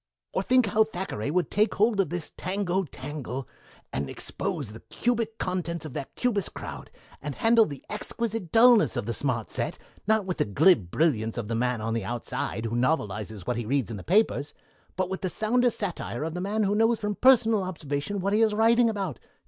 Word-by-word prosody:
"Or - - +1
think 255 -2 +4
of 205 - -4
how 220 - +6
Thackeray 180 - -4
would 175 +3 0
take 215 +2 +2
hold 215 0 +2
of 190 -6 +2
this 175 -2 -4
tango 190 0 -1
tangle 135 -2 -6 0.5
and 70 0 -2
expose 170 - -4
the 110 +2 -10
cubic 230 -2 -2
contents 170 -3 -3
of 150 - -7
that 135 - -6
Cubist 215 -6 -1
crowd, - - -7 0.3
and 145 -1 -5
handle 225 -1 +4
the 140 -3 -9
exquisite 215 -3 -4
dullness 230 -1 +6
of - - -2
the 115 - -2
smart 120 -5 -2
set, - - -2 0.3
not 220 -2 +3
with 180 -2 -3
the - - +2
glib 105 - +4
brilliance 115 - +1
of 115 -3 -4
the - - -1
man 125 0 0
on 110 +1 -2
the 115 -2 -1
outside, 115 +1 -3
who 115 +1 -2
novelizes 110 - -1
what 125 - -1
he 120 - -3
reads 135 -2 0
in 110 - -4
the 95 - -8
papers, 185 -6 +1 0.4
but 185 -1 0
with 190 +1 -4
the 185 - -1
sounder 245 +6 +2
satire 180 - -4
of 160 0 -3
the 180 - -4
man 210 +3 0
who 200 0 +1
knows 225 +2 +3
from 210 -1 -2
personal 225 -3 +5
observation 170 0 -3
what 200 +2 0
he 215 - +3
is 220 -2 +3
writing 230 +2 +4
about! 195 - -3
180 Hz, 205 wpm, -27 LUFS, -, 0.5 s, how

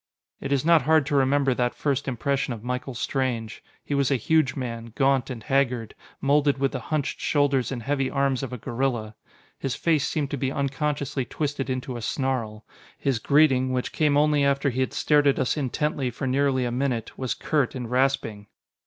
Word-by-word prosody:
It 140 - -5
is 140 0 +1
not 165 -2 +6
hard 155 +1 +3
to 145 +1 -1
remember 135 0 +3
that 120 0 -1
first 140 -1 -1
impression 135 0 -1
of 110 - -12
Michael 125 +1 -4
Strange. 120 -3 -2 0.2
He - - -3
was 140 -2 +2
a 140 - +3
huge 135 +1 +2
man, 115 -3 -5
gaunt 135 -2 +2
and 120 -4 -6
haggard, 125 -4 0 0.3
moulded 140 0 +2
with 135 0 +1
the 130 - -3
hunched 140 +4 -2
shoulders 140 -4 +1
and 120 -4 -4
heavy 135 0 0
arms 140 -2 0
of 135 - -5
a 125 - -4
gorilla. 120 -2 -2 0.5
His 135 - -2
face 160 -4 +1
seemed 145 -3 -2
to 145 - -2
be 135 0 -1
unconsciously 140 0 -1
twisted 145 -1 -3
into 130 -1 -3
a - - -6
snarl. 115 -4 -2 0.3
His 135 -5 0
greeting, 135 -2 +3
which 125 -1 -2
came 150 -2 +2
only 150 -1 +3
after 140 0 +2
he 125 - -3
had 130 - 0
stared 145 -1 +3
at 140 - +3
us 130 - +1
intently, 145 -1 -1
for 125 +3 -5
nearly 130 -1 +1
a 120 - -2
minute, 125 -3 -2
was 130 -2 -2
curt 145 -6 0
and 125 -2 -4
rasping. 125 -5 0
135 Hz, 195 wpm, -25 LUFS, 125-140 Hz, 0.5 s, not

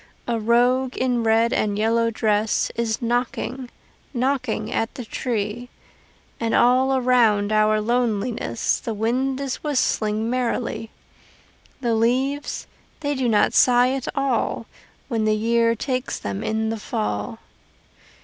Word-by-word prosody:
A 235 -1 0
rogue 245 +3 +2
in 250 -2 +1
red 225 +1 +3
and 205 -1 0
yellow 230 +2 +2
dress 215 -1 0
Is 230 0 -2
knocking, 245 +1 -2 0.5
knocking 250 -4 -1
at 225 - -1
the 250 - -6
tree; 230 0 -3 0.7
And 230 -1 0
all 260 +2 +4
around 230 -5 +3
our 215 0 +3
loneliness 230 0 0
The 225 - -4
wind 255 +5 0
is 275 -2 -3
whistling 220 -7 0
merrily. 240 -2 -2 0.9
The 235 -3 +1
leaves 260 +6 0 0.4
they 290 -1 -1
do 260 -3 0
not 210 -2 +3
sigh 245 0 +5
at 270 -2 -4
all 275 -1 0 0.4
When 225 -4 -1
the 215 0 +3
year 230 +1 +2
takes 255 +2 -2
them 100 -1 -4
in 220 0 -1
the 225 - -4
fall. 105 - -3
235 Hz, 130 wpm, -23 LUFS, 220-255 Hz, 0.9 s, sigh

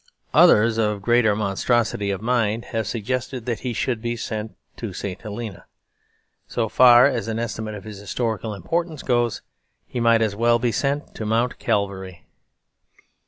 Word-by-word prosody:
Others, 115 +1 +5
of 105 -2 0
greater 120 -2 +3
monstrosity 105 +1 0
of 100 +1 -3
mind, 115 -2 0
have 110 -2 -1
suggested 125 +2 -3
that 120 -3 -2
he 125 - -3
should 120 0 -2
be 120 0 -2
sent 110 -1 -5 0.2
to 110 -5 -5
St. 95 0 -5
Helena. 105 -3 -7 0.8
So 115 -2 -1
far 120 0 +7
as 115 -6 0
an 110 0 -2
estimate 110 -2 -4
of 100 - -9
his 105 -1 -9
historical 110 0 -3
importance 160 - -3
goes, 120 -3 0 0.4
he 125 - -5
might 115 -1 +4
as 105 -2 -1
well 120 +2 +3
be 120 0 0
sent 140 +4 -2
to - - -6
Mount 115 +3 0
Calvary. 95 -3 -2
115 Hz, 160 wpm, -23 LUFS, 105-120 Hz, 0.8 s, far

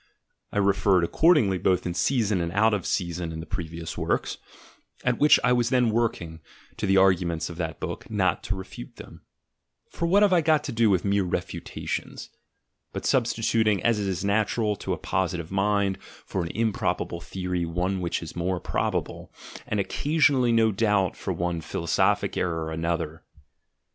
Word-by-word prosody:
I - - -4
referred 100 -2 +3
accordingly 110 - +3
both' 90 -1 +1
in 90 - -2
season 105 -1 +1
and 85 0 -2
out 110 +2 +3
of 100 -4 -1
season 85 -2 -2
in 80 - -6
the 80 - -6
previous 85 -4 -5
works, - - -1 0.6
at 125 -1 0
which 150 +1 +6
I 125 - +4
was 120 -1 +2
then 125 -3 +3
working, 95 -8 -1 0.4
to - - -2
the 95 0 +4
arguments 85 -4 +2
of 85 - -10
that 80 -2 -4
book, - - -6
not 95 -4 +1
to 100 - -1
refute 95 -10 -9
them - - -12 0.3
— - - -51
for 170 - -2
what 200 +4 +5
have 200 -2 +4
I 175 - +5
got 155 -1 +2
to - - -4
do 115 -1 +3
with 95 -2 +1
mere 100 0 +2
refutations 90 - -4 0.3
— - - -51
but - - -5
substituting, 115 -5 +1
as 115 -2 +2
is 95 -1 -2
natural 105 +1 +1
to - - -3
a - - -3
positive 90 -3 -2
mind, 100 0 +1
for 95 - -6
an 85 - -3
improbable 110 -6 -1
theory 90 +2 -3
one 90 +3 -1
which 85 -1 -2
is 80 - -9
more 90 +1 -1
prob - - -1
able, - - -4 0.4
and 105 - -1
occasionally 140 +2 +2
no 115 -1 +4
doubt 105 -3 +1
for - - -4
one 85 -1 -2
philosophic 85 +1 0
error 80 -2 -2
another. 80 -1 -3
95 Hz, 175 wpm, -26 LUFS, 85-110 Hz, 0.6 s, which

